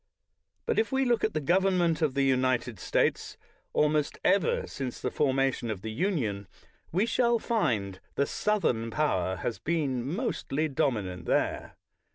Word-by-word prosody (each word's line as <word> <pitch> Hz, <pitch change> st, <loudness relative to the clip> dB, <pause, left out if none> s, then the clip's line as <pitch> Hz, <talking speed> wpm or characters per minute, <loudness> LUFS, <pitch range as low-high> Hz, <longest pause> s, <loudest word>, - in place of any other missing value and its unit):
But, 470 Hz, -, +1 dB
if 225 Hz, -, 0 dB
we 265 Hz, 0 st, +2 dB
look 240 Hz, -2 st, +2 dB
at 220 Hz, -, 0 dB
the -, -, +2 dB
government 175 Hz, +1 st, +2 dB
of 150 Hz, -4 st, +1 dB
the 140 Hz, -, +2 dB
United 130 Hz, -4 st, +1 dB
States -, -, 0 dB, 0.3 s
almost 150 Hz, -1 st, +1 dB
ever 195 Hz, -5 st, +2 dB
since 130 Hz, -3 st, -5 dB
the 125 Hz, -, -2 dB
formation 135 Hz, -4 st, +1 dB
of 100 Hz, -3 st, -4 dB
the 110 Hz, -, -4 dB
Union, 110 Hz, -, -1 dB, 0.4 s
we 190 Hz, +6 st, +2 dB
shall 235 Hz, 0 st, +2 dB
find 110 Hz, -, -1 dB, 0.2 s
the 140 Hz, -, +2 dB
Southern 140 Hz, -, 0 dB
power 95 Hz, -, 0 dB
has 110 Hz, +6 st, -4 dB
been 145 Hz, -7 st, -1 dB
mostly 160 Hz, -, -1 dB
dominant 110 Hz, -, -1 dB
there. -, -, -1 dB
140 Hz, 150 wpm, -28 LUFS, 115-185 Hz, 0.4 s, we